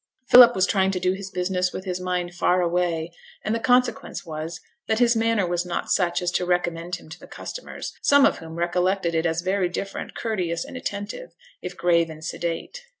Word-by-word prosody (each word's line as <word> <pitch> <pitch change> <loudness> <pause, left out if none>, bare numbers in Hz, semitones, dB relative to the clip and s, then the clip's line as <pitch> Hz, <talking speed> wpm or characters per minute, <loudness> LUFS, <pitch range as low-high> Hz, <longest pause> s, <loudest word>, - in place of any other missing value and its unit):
Philip 245 -1 +9
was 185 - +3
trying 190 -2 +2
to 190 -1 -1
do 180 +1 +1
his 195 0 -7
business 180 -1 -1
with 190 - -7
his 180 -1 -3
mind 180 -1 -2
far 180 +1 +2
away; 170 -1 0 0.3
and 215 - 0
the 230 - 0
consequence 245 -3 +1
was 160 0 -5 0.3
that 220 - +1
his 240 0 +4
manner 225 -3 +2
was 175 0 -1
not 180 -1 -3
such 180 -1 +1
as 175 - 0
to 180 - 0
recommend 175 -1 -1
him 175 - -13
to 160 - -10
the - - -13
customers, - - -7
some 285 -1 +6
of - - +2
whom 160 0 -9
recollected 175 +1 0
it 165 +1 +1
as 165 +1 -1
very 185 -1 +1
different, 195 +2 -5
courteous 180 -7 -2
and - - -10
attentive, 205 - -5 0.3
if 180 0 -7
grave 170 -1 +3
and 155 0 -9
sedate. 170 - -4
180 Hz, 205 wpm, -24 LUFS, 170-200 Hz, 0.3 s, Philip